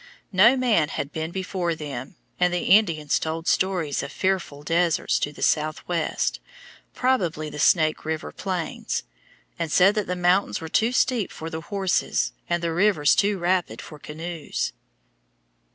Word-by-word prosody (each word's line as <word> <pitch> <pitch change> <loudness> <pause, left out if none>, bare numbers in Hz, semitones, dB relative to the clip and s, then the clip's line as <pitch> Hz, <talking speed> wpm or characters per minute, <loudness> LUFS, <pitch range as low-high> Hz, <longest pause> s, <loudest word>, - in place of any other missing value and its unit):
No 225 +7 +6
man 215 -12 +2
had 140 - -4
been 160 +1 -3
before 185 -2 -2
them, 145 -1 -7 0.2
and 180 0 +3
the 175 -1 -1
Indians 165 -8 +3
told 165 +1 -4
stories 180 -7 +1
of 140 - -6
fearful 185 -7 -2
deserts 165 +2 +1
to 145 - -2
the - - -7
southwest 155 +2 0 0.6
(probably 175 -12 0
the 150 - -7
Snake 155 0 +3
River 160 0 -3
plains), 185 -4 -3 0.6
and 165 -2 -2
said 190 +5 +5
that 210 -2 -2
the 180 - -1
mountains 180 +2 +2
were 160 - -7
too 225 +8 +2
steep 250 -5 +1
for 160 +1 -7
the 160 - -4
horses, 190 +1 0 0.2
and 175 0 0
the 165 -1 0
rivers 175 -5 +3
too 205 0 +2
rapid 180 0 0
for 150 - -10
canoes. 160 +2 -4
170 Hz, 150 wpm, -24 LUFS, 155-190 Hz, 0.6 s, No